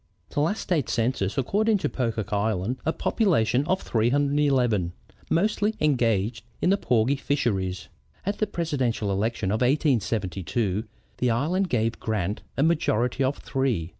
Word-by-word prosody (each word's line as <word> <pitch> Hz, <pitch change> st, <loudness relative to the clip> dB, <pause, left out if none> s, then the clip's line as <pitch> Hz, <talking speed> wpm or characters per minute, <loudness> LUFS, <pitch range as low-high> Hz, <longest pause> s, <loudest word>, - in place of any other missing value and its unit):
The -, -, -1 dB
last 165 Hz, +9 st, +1 dB
state 160 Hz, -8 st, 0 dB
census 115 Hz, -2 st, 0 dB
accords 205 Hz, -, +2 dB
to -, -, 0 dB
Pocock 110 Hz, -4 st, -2 dB
Island 105 Hz, +3 st, 0 dB
a -, -, +4 dB
population 140 Hz, -, +2 dB
of 190 Hz, +1 st, 0 dB
311, 125 Hz, -5 st, +2 dB, 0.4 s
mostly 210 Hz, +4 st, +1 dB
engaged 115 Hz, -6 st, +1 dB, 0.2 s
in 180 Hz, -, +2 dB
the 200 Hz, -, +4 dB
porgy 125 Hz, -, +2 dB
fisheries. 95 Hz, -11 st, -1 dB, 0.4 s
At 200 Hz, +1 st, -2 dB
the 215 Hz, -, +1 dB
Presidential 130 Hz, -, -1 dB
election 100 Hz, 0 st, -1 dB
of 110 Hz, -, 0 dB
1872 110 Hz, -, 0 dB, 0.3 s
the 125 Hz, -, +2 dB
island 165 Hz, +11 st, +1 dB
gave 115 Hz, -3 st, 0 dB
Grant 105 Hz, -2 st, -2 dB, 0.2 s
a 135 Hz, -, +3 dB
majority 135 Hz, -6 st, +1 dB
of 135 Hz, +2 st, 0 dB
three. 125 Hz, -, -1 dB
125 Hz, 135 wpm, -25 LUFS, 110-150 Hz, 0.4 s, a